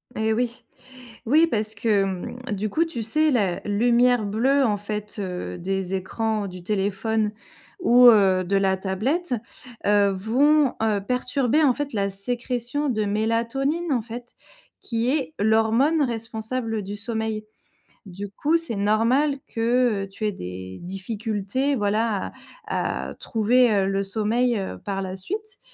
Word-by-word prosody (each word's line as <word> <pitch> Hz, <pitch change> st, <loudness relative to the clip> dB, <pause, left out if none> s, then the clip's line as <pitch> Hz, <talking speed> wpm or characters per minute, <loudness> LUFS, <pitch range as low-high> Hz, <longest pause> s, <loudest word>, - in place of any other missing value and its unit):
Eh 220 Hz, 0 st, 0 dB
oui, 240 Hz, +1 st, -2 dB, 0.6 s
oui 310 Hz, +7 st, +5 dB
parce 215 Hz, -5 st, -1 dB
que, 205 Hz, -2 st, +2 dB
hem, 190 Hz, +5 st, -4 dB
du 205 Hz, +1 st, -1 dB
coup, 330 Hz, +10 st, +1 dB
tu 300 Hz, -8 st, -5 dB
sais, 305 Hz, +7 st, +2 dB
la 200 Hz, -8 st, +1 dB
lumière 240 Hz, +2 st, +3 dB
bleue, 260 Hz, +7 st, +2 dB
en 210 Hz, -2 st, +1 dB
fait, 210 Hz, 0 st, -5 dB
heu, 180 Hz, -2 st, -4 dB
des 190 Hz, +1 st, -2 dB
écrans 210 Hz, +2 st, -2 dB
du 180 Hz, -1 st, -9 dB
téléphone 210 Hz, +2 st, 0 dB, 0.5 s
ou, 250 Hz, -7 st, +6 dB
heu, 190 Hz, -4 st, +5 dB
de 195 Hz, +3 st, -1 dB
la 190 Hz, -1 st, +2 dB
tablette, 245 Hz, -, -1 dB, 0.5 s
heu, 205 Hz, -1 st, +4 dB
vont, 260 Hz, +8 st, +3 dB
heu, 210 Hz, -3 st, +1 dB
perturber, 250 Hz, +5 st, +1 dB
en 260 Hz, -4 st, +5 dB
fait, 290 Hz, -2 st, -4 dB
la 200 Hz, -1 st, 0 dB
sécrétion 245 Hz, +6 st, -3 dB
de 215 Hz, -3 st, 0 dB
mélatonine, 230 Hz, +10 st, 0 dB
en 245 Hz, -4 st, +2 dB
fait, 240 Hz, +1 st, -8 dB, 0.5 s
qui 230 Hz, +1 st, -1 dB
est 300 Hz, +1 st, -1 dB
l'hormone 225 Hz, +9 st, +3 dB
responsable 225 Hz, -1 st, -3 dB
du 200 Hz, +2 st, -5 dB
sommeil. 220 Hz, 0 st, -3 dB, 0.6 s
Du 195 Hz, +2 st, -7 dB
coup, 300 Hz, +11 st, +1 dB
c'est 330 Hz, -10 st, -5 dB
normal 235 Hz, +8 st, +2 dB, 0.2 s
que, 230 Hz, -3 st, +2 dB
heu, -, -, -15 dB
tu 215 Hz, +2 st, -5 dB
aies 210 Hz, -, +1 dB
des 95 Hz, -, -7 dB
difficultés, 210 Hz, +7 st, -2 dB
voilà, 210 Hz, -1 st, 0 dB, 0.4 s
à -, -, -2 dB
à -, -, -10 dB
trouver, 240 Hz, +2 st, +2 dB
heu, 195 Hz, -1 st, +2 dB
le 195 Hz, 0 st, 0 dB
sommeil, 225 Hz, +4 st, +1 dB
heu, 195 Hz, -, -4 dB
par 195 Hz, -1 st, -3 dB
la 190 Hz, 0 st, -4 dB
suite. 415 Hz, -, -6 dB
220 Hz, 150 wpm, -24 LUFS, 200-250 Hz, 0.6 s, ou